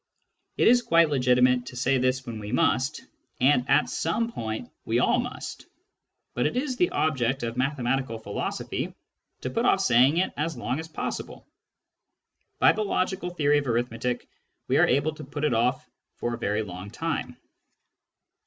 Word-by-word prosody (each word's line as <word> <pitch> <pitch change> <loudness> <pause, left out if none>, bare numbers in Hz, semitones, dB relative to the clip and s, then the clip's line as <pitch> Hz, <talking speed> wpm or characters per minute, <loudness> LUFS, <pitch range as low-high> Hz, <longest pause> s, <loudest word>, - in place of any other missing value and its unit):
It - - +4
is 245 +1 +6
quite 165 -7 +4
legitimate 125 -2 +3
to 125 - -8
say 130 +1 +1
this 130 +1 0
when 115 -3 -6
we 105 0 -6
must, 130 +3 +1 0.3
and 130 -1 +3
at 135 +3 +4
some 230 +8 -1
point 110 - -5
we - - 0
all - - +3
must; - - -6 0.7
but 125 - +1
it 155 - -3
is 260 0 -1
the 355 +7 +2
object 135 -4 0
of 115 0 -3
mathematical 130 -2 -1
philosophy 105 -2 -4 0.5
to - - -3
put - - 0
off - - +4
saying 130 +7 +4
it 185 - +1
as 155 -1 -2
long 125 +4 -2
as 160 - -6
possible. 160 - -5 1.1
By - - +6
the 215 - -2
logical 185 -2 -1
theory 150 -4 +2
of 140 - -5
arithmetic 120 +1 -1 0.4
we - - +2
are - - +5
able 150 +3 +1
to 155 - -10
put 145 +2 -6
it 150 - +2
off 125 +3 +1 0.3
for 120 - -3
a - - -3
very 105 -1 0
long 95 0 -8
time. 125 -1 -3
130 Hz, 170 wpm, -26 LUFS, 120-155 Hz, 1.1 s, is